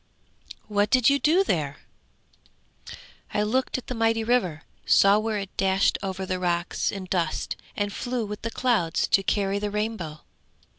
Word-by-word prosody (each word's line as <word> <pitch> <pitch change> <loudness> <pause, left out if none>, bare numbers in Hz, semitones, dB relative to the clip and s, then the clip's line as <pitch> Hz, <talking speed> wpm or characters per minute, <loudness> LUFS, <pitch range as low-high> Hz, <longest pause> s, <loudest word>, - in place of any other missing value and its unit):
'What 205 -1 +1
did 255 +2 +5
you 280 - +2
do 335 +7 +4
there?' 145 - -1 1.6
'I 210 - +2
looked 255 +6 0
at 255 - -8
the - - -4
mighty 225 -1 +1
river, 190 -10 0 0.2
saw 200 +1 +5
where 220 0 -1
it 195 -1 -6
dashed 190 0 +2
over 190 -1 -4
the 185 -1 -2
rocks 175 -1 -1
in 195 -2 -6
dust 175 -4 -1 0.2
and 205 -1 -1
flew 245 0 -2
with 210 +1 -6
the 230 - -3
clouds 220 -10 +1
to 195 - +4
carry 195 0 0
the 210 0 -2
rainbow. 210 -7 -3
205 Hz, 160 wpm, -25 LUFS, 185-225 Hz, 1.6 s, did